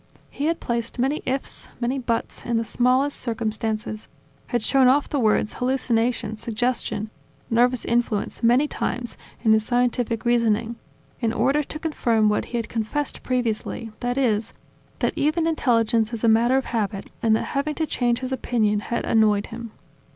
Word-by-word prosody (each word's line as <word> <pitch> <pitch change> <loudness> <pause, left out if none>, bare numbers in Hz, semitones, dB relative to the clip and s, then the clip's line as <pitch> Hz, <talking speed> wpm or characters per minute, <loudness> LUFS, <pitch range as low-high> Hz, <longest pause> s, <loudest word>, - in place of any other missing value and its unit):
He 285 - -3
had 330 +1 +1
placed 235 0 -3
many 270 +5 0
"ifs," 265 +1 -3
many 250 +3 -1
"buts" 235 -2 -2
in 235 -1 0
the 225 - 0
smallest 255 +5 +1
circumstances, 220 -2 -3 0.4
had 240 -2 -1
shown 265 +1 +4
off 280 +3 +4
the 285 - -1
words 215 -2 +2
"hallucination" 240 -3 0
"suggestion" 225 -1 -1 0.4
"nervous 245 +1 +3
influence" 235 -3 0
many 245 +5 +4
times 240 -4 -3 0.3
in 220 - +5
his 220 0 +3
scientific 245 -1 0
reasoning, 230 -1 +2 0.4
in 230 -3 +1
order 265 +6 +2
to 300 - -6
confirm 235 -9 +1
what 210 - 0
he 240 - -4
had 230 - -2
confessed 230 +6 -2
previously, 230 -2 -2
that 245 +1 -2
is: 225 -5 +1 0.4
that - - 0
even 310 +3 +1
intelligence 230 -7 +2
is 230 -1 -5
a - - +4
matter 235 +4 +4
of 270 - 0
habit 205 -3 -2
and 220 -1 +4
that - - 0
having 290 +2 -1
to 320 - 0
change 240 -4 0
his 260 0 -4
opinion 220 -5 +1
had 235 +3 -3
annoyed 210 -2 +3
him. 230 -1 -7
235 Hz, 165 wpm, -24 LUFS, 225-255 Hz, 0.4 s, in